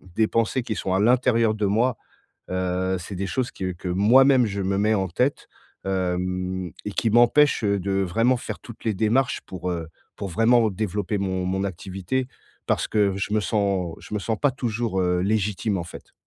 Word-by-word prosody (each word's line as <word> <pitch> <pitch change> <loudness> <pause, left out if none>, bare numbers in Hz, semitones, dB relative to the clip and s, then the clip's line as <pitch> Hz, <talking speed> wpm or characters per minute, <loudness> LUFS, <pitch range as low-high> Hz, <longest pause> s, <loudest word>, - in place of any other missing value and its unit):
des 110 - +3
pensées 115 +2 0
qui 110 - -3
sont 95 - -2
à - - +2
l'intérieur 115 -1 +3
de 105 -1 -1
moi. 115 +4 +1 0.5
Heu, 95 0 -1
c'est 95 +3 -7
des 95 +1 -3
choses 130 +1 -2
qui, 95 - -7
heu, 95 - -1
que 90 - -6
moi-même 125 +8 +5
je 100 -1 -3
me 95 +1 0
mets 105 +2 +2
en 95 -3 0
tête, 125 - -1 0.4
hem 90 -1 -2
et 105 - -3
qui 115 - 0
m'empêchent, 120 +2 +4
heu, 100 -1 +2
de 100 +2 -2
vraiment 115 +8 +2
faire - - -6
toutes 115 -1 -12
les 110 - +1
démarches 115 +6 +1
pour, 90 -1 -5
heu, 85 -2 -4 0.3
pour 100 - -5
vraiment 115 +4 +3
développer 105 +1 -2
mon 95 -1 -2
mon 95 +1 -1
activité 95 +6 -3 0.4
parce - - +1
que 100 -3 +2
je 100 +1 -3
me 105 - +3
sens 100 -5 0
je - - -13
me - - 0
sens 110 +2 -1
pas 145 - +3
toujours, 115 -6 -2
heu, 90 -1 +1
légitime, 105 0 0
en 85 - -4
fait. 90 - -12
100 Hz, 200 wpm, -24 LUFS, 95-115 Hz, 0.5 s, moi-même